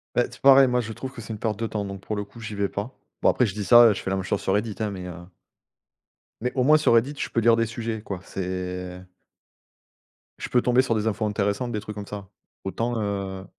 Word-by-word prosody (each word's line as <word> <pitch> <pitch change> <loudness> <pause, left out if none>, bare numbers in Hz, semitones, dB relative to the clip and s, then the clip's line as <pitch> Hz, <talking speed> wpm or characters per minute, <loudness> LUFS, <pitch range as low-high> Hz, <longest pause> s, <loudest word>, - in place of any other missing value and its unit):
Ben 120 - +3
c'est - - -15
pareil, 135 0 +8
moi 125 0 +1
je 115 -1 -6
trouve 130 +4 -6
que 115 - -8
c'est 110 - -8
une 110 - -5
perte 110 -2 -1
de 115 - -1
temps, 105 -2 -3
donc 100 -1 -7
pour 105 - -4
le 105 - -3
coup, 115 +3 -14
j'y 110 -1 -6
vais 100 0 0
pas. 105 +6 -5 0.3
Bon - - +5
après 125 - +3
je 100 - -3
dis 105 0 -4
ça, 115 +3 +8
je 95 - -6
fais - - -4
la 95 - 0
même 95 - -2
chose 100 +2 -1
sur 95 - 0
Reddit 105 +1 -1
hein 110 -2 -1
mais 95 -2 -7
heu 90 - -6 1.3
mais 125 +2 -1
au 130 - +2
moins 155 +4 +6
sur 150 - +3
Reddit, 130 +6 +2
je - - -3
peux - - 0
lire 115 0 +5
des 115 0 +1
sujets 110 0 -4
quoi, 100 -3 -5
c'est 90 -1 -5 1.4
Je - - -6
peux 125 - +3
tomber 125 +1 +4
sur 125 -3 0
des 110 0 -1
infos 110 0 0
intéressantes, 105 +3 -1
des 105 - -2
trucs 105 0 -8
comme 100 -1 -7
ça. 100 -2 -8 0.3
Autant, 115 +4 -2
heu 100 -2 -3
105 Hz, 260 wpm, -25 LUFS, 100-120 Hz, 1.4 s, pareil